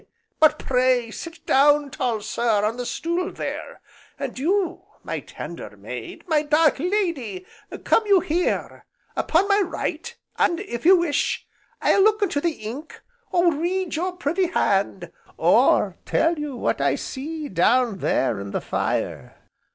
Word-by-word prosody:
But 310 -1 +5
pray 250 -2 +1
sit 335 +8 -9
down, 290 +1 +4
tall 230 -4 -1
sir, 215 0 0
on 225 +3 -1
the 245 -1 -4
stool 345 +2 -2
there; - - -6 0.4
and 275 -3 -5
you, 370 +6 0 0.2
my - - -3
tender - - -9
maid, - - -8
my 310 -3 +3
dark 305 -1 +3
lady, 320 - -1 0.4
come 445 - +3
you 400 -2 +6
here 350 0 -2 0.3
upon 350 +5 +2
my 405 0 +4
right, 470 +5 -3 0.2
and, 340 - +2
if 275 - -3
you 375 0 +8
wish, 340 -4 0 0.4
I'll 395 - +4
look 430 +1 +4
into 315 -7 0
the 335 0 0
ink, 265 +9 -7 0.3
or 345 -1 +3
read 350 +4 -1
your 360 +3 -1
pretty 350 +3 0
hand, 350 - 0 0.3
or - - +3
tell 325 0 +1
you 295 -3 -4
what - - -1
I - - +2
see 305 +3 -5
down 220 +3 +2
there 115 -10 +1
in 100 0 -6
the - - -3
fire. - - -3
310 Hz, 150 wpm, -23 LUFS, 250-360 Hz, 0.4 s, you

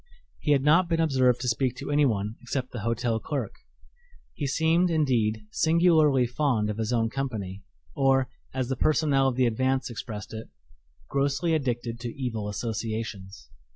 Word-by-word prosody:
He 150 - +2
had 135 -2 +2
not 165 +4 +4
been 165 -1 +1
observed 130 -6 +3
to 125 - -3
speak 125 +1 0
to 140 +2 -6
anyone 110 -8 +1
except 130 -2 -3
the 120 - -5
hotel 115 +1 0
clerk. 140 +6 -3 0.8
He 145 - -3
seemed, 165 +5 +2
indeed, 120 -9 +1
singularly 160 -5 +4
fond 120 -4 0
of 105 - -6
his 110 +1 -1
own 115 -2 +1
company 110 -8 -4 0.3
or, 135 -1 +3 0.2
as 130 -1 -2
the 135 - 0
personnel 145 -1 +2
of 130 - 0
the 130 0 +3
Advance 130 +3 0
expressed 110 -2 -7
it, 110 0 -7 0.6
"grossly 140 +4 0
addicted 120 -5 -2
to 120 +2 -7
evil 110 -5 -3
associations." 110 - -5
130 Hz, 155 wpm, -27 LUFS, 115-145 Hz, 0.8 s, not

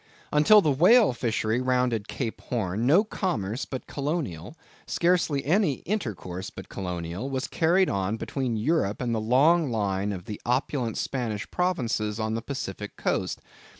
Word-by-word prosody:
Until 155 +9 +7
the 155 - +2
whale 180 - +5
fishery 115 0 0
rounded 125 -4 +1
Cape 115 -5 -4
Horn, 110 -1 -2
no 170 +9 +6
commerce 130 - -2
but 130 - -6
colonial, 140 - -3 0.3
scarcely 170 -5 +1
any 175 0 +3
intercourse 105 - -3
but 95 - -11
colonial, 90 +5 -4
was 130 0 -2
carried 180 +3 +3
on 100 +3 -1
between 125 -2 -2
Europe 110 -4 0
and 120 -2 -1
the 110 - 0
long 145 +8 +4
line 100 -3 -1
of 90 -3 -6
the 105 - -7
opulent 125 -1 -1
Spanish 110 -8 -3
provinces 120 - -1
on 110 0 -1
the 115 - -2
Pacific 105 -6 -6
coast. - - -2
125 Hz, 150 wpm, -26 LUFS, 105-150 Hz, 0.3 s, Until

